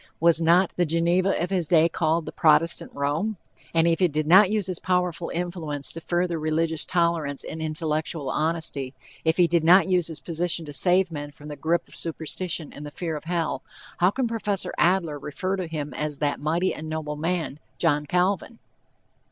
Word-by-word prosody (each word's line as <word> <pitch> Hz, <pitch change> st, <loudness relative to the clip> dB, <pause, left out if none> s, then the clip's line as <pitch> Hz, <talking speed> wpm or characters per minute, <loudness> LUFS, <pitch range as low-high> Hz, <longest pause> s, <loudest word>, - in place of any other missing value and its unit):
Was 170 Hz, 0 st, +4 dB
not 170 Hz, +3 st, +4 dB
the 175 Hz, -, +3 dB
Geneva 170 Hz, +4 st, +2 dB
of 175 Hz, +3 st, -2 dB
his 180 Hz, -4 st, 0 dB
day 165 Hz, 0 st, +5 dB
called 165 Hz, 0 st, 0 dB
the -, -, -6 dB
Protestant 160 Hz, +1 st, +3 dB
Rome? 155 Hz, +10 st, -1 dB, 0.3 s
And 165 Hz, 0 st, +3 dB
if 165 Hz, -1 st, +2 dB
he 185 Hz, -, +4 dB
did 155 Hz, -1 st, -2 dB
not 185 Hz, +5 st, +7 dB
use 210 Hz, -2 st, 0 dB
his 185 Hz, -2 st, -3 dB
powerful 180 Hz, -2 st, -1 dB
influence 165 Hz, -5 st, -3 dB
to 165 Hz, -, -7 dB
further 175 Hz, 0 st, -1 dB
religious 160 Hz, +1 st, 0 dB
tolerance 170 Hz, -5 st, 0 dB
and 160 Hz, -, -6 dB
intellectual 155 Hz, -1 st, -2 dB
honesty; 150 Hz, -3 st, -2 dB, 0.3 s
if 160 Hz, +1 st, +2 dB
he 180 Hz, -, +6 dB
did 170 Hz, -1 st, +1 dB
not 180 Hz, +4 st, +6 dB
use 180 Hz, -3 st, +2 dB
his 160 Hz, -2 st, -4 dB
position 170 Hz, 0 st, -2 dB
to 145 Hz, -, -8 dB
save 180 Hz, +3 st, +3 dB
men 145 Hz, -2 st, -5 dB
from 145 Hz, +1 st, -12 dB
the 150 Hz, -, -6 dB
grip 160 Hz, +5 st, 0 dB
of -, -, -15 dB
superstition 165 Hz, 0 st, -4 dB
and 145 Hz, -, -9 dB
the 145 Hz, -, -6 dB
fear 160 Hz, +1 st, -4 dB
of 150 Hz, -, -7 dB
hell, 170 Hz, -1 st, -1 dB, 0.4 s
how 180 Hz, -, +5 dB
can 250 Hz, +4 st, -1 dB
Prof. 210 Hz, -4 st, -1 dB
Adler 170 Hz, -5 st, +2 dB
refer 185 Hz, +7 st, -3 dB
to 185 Hz, -3 st, -4 dB
him 150 Hz, -3 st, -5 dB
as 150 Hz, +1 st, -3 dB
"that 145 Hz, 0 st, -1 dB
mighty 165 Hz, +5 st, 0 dB
and 155 Hz, 0 st, -7 dB
noble 155 Hz, -1 st, -3 dB
man 160 Hz, -2 st, -2 dB, 0.2 s
John 150 Hz, -3 st, +1 dB
Calvin?" 185 Hz, +6 st, 0 dB
165 Hz, 195 wpm, -25 LUFS, 155-180 Hz, 0.4 s, not